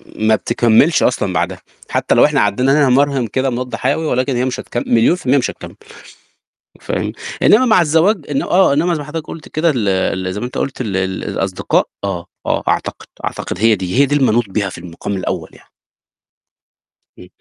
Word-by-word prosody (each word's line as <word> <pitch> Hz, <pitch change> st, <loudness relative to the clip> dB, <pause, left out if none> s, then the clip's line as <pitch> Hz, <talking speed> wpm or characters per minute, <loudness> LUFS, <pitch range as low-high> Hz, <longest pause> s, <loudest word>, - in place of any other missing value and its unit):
ما 110 Hz, 0 st, +2 dB
بتكملش 120 Hz, +8 st, +3 dB
اصلًا 100 Hz, -6 st, 0 dB
بعدها، -, -, -2 dB, 0.3 s
حتى -, -, +1 dB
لو -, -, +6 dB
احنا -, -, +2 dB
عدينا 130 Hz, +7 st, +2 dB
نمرهم 135 Hz, -1 st, +2 dB
كده 130 Hz, +5 st, -1 dB
مضاد 125 Hz, -1 st, -4 dB
حيوي 140 Hz, +7 st, -1 dB
ولكن 130 Hz, -2 st, 0 dB
هي 125 Hz, +1 st, 0 dB
مش 130 Hz, -, -3 dB
هتكم 120 Hz, -, -4 dB
مليون 120 Hz, +9 st, +3 dB
في 180 Hz, -, -12 dB
المِيَّة 135 Hz, +3 st, +4 dB
مش 120 Hz, -, -1 dB
هتكمّل. -, -, -11 dB, 1.1 s
فاهم؟ -, -, -3 dB, 0.3 s
إنما 250 Hz, +5 st, +5 dB
مع 220 Hz, -6 st, +4 dB
الزواج 165 Hz, +3 st, +2 dB
إن 140 Hz, -, 0 dB
آه 185 Hz, -6 st, +3 dB
إنما 170 Hz, +4 st, +1 dB
زي 155 Hz, -, -2 dB
ما 145 Hz, -, -6 dB
حضرتك 155 Hz, 0 st, -6 dB
قلت 160 Hz, -, -9 dB
كده 165 Hz, +2 st, +1 dB
ال 105 Hz, -4 st, -1 dB
ال 95 Hz, 0 st, -1 dB
زي 105 Hz, -, -4 dB
ما 120 Hz, -, -3 dB
انت 125 Hz, -, -6 dB
قُلت 135 Hz, -1 st, -3 dB
ال 100 Hz, -5 st, -2 dB
ال 95 Hz, 0 st, -2 dB
الأصدقاء. 95 Hz, -1 st, -1 dB, 0.2 s
آه، 90 Hz, -3 st, -3 dB, 0.2 s
آه -, -, 0 dB
أعتقد، -, -, -2 dB, 0.2 s
أعتقد 90 Hz, -, -5 dB
هي 110 Hz, 0 st, +4 dB
دي، 95 Hz, +6 st, -2 dB
هي 140 Hz, -, +6 dB
دي 145 Hz, +2 st, 0 dB
اللي 135 Hz, -3 st, +3 dB
منوط 115 Hz, -2 st, +1 dB
بيها 100 Hz, 0 st, -1 dB
في -, -, -10 dB
المقام 90 Hz, +3 st, -6 dB
الأول 95 Hz, -, -4 dB
يعني. -, -, -20 dB, 1.5 s
امم. 90 Hz, -, -13 dB
125 Hz, 200 wpm, -17 LUFS, 100-145 Hz, 1.5 s, لو